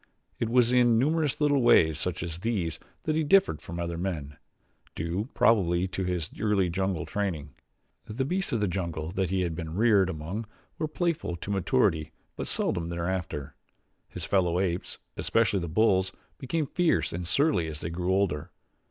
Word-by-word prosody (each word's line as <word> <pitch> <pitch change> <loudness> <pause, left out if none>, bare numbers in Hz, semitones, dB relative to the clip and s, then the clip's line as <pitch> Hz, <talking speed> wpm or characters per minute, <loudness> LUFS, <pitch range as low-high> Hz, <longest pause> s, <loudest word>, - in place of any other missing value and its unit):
It 115 - 0
was 120 0 +4
in 120 -2 +5
numerous 150 +3 +1
little 145 -2 +3
ways 80 -9 +5
such 90 0 -2
as 85 -1 -5
these 95 -6 -2 0.2
that 155 - 0
he 160 - +2
differed 195 +6 +4
from 85 0 -7
other 85 -1 -3
men, 80 -6 -3 0.6
due, 90 +9 -2
probably, 90 -5 +3
to 95 - -3
his 90 -3 -2
early 100 -5 +2
jungle 95 -2 -1
training. 80 -9 -3 0.5
The 125 +5 -2
beasts 185 +6 -1
of 115 - 0
the 105 - +2
jungle 85 -4 -3
that 95 -2 -1
he 95 0 0
had 85 -2 -1
been 80 -1 -5
reared 105 -3 +4
among 95 +7 -5 0.3
were 155 - 0
playful 165 - -1
to 90 +4 -6
maturity 80 -5 +1 0.2
but - - -4
seldom 85 -1 -1
thereafter. 85 -5 -3 0.6
His - - -4
fellow 90 -3 +2
apes, 90 -2 -2 0.2
especially 110 -3 +2
the 85 - -3
bulls, 95 0 +3 0.3
became 150 +3 -1
fierce 175 +3 +1
and 85 0 -4
surly 100 - +2
as 75 -1 -6
they 80 - -4
grew 90 +2 -1
older. 95 -6 0
95 Hz, 170 wpm, -28 LUFS, 85-115 Hz, 0.6 s, in